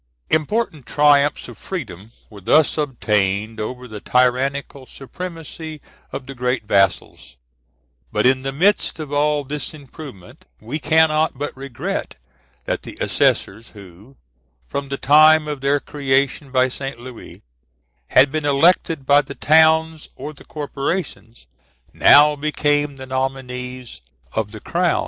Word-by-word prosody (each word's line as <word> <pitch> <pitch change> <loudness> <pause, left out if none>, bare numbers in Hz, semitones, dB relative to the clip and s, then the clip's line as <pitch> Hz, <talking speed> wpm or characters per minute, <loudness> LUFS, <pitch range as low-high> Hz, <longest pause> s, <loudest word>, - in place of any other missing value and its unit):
Important 160 - -1
triumphs 145 -1 +3
of - - -12
freedom 115 - -7 0.2
were 105 -2 -14
thus 155 +10 +3
obtained 110 -6 -1
over 125 +4 -5
the 110 -2 -8
tyrannical 130 +3 0
supremacy 160 +1 -8 0.3
of 135 - -6
the 135 - -8
great 125 -2 -2
vassals; 100 - 0 0.7
but - - 0
in 130 +1 +3
the 135 +1 -3
midst 190 +9 +1
of 150 -2 -6
all 145 0 +1
this 145 +2 -5
improvement 140 - -12
we 130 +8 -5
cannot 155 -1 +2
but 145 +2 -4
regret 135 -2 -5 0.5
that - - -2
the - - -11
assessors, 110 +4 0
who, 100 +6 -15 0.5
from 140 - -5
the 140 - -3
time 155 +2 +5
of 145 -3 -5
their 140 +1 +2
creation 140 0 -1
by 130 0 +3
St. 135 -1 -6
Louis, 125 -1 -12 0.6
had 135 +1 +5
been 155 0 -2
elected 145 0 +2
by 145 +1 +5
the 140 - -10
towns 160 0 +3
or 145 +4 -7
the 140 - -17
corporations, 145 -4 -5 0.5
now 150 +1 +6
became 145 -1 0
the 130 0 -9
nominees 130 - -5 0.3
of 110 -2 -2
the 110 -1 -10
crown. 175 0 0
140 Hz, 135 wpm, -20 LUFS, 125-150 Hz, 0.7 s, now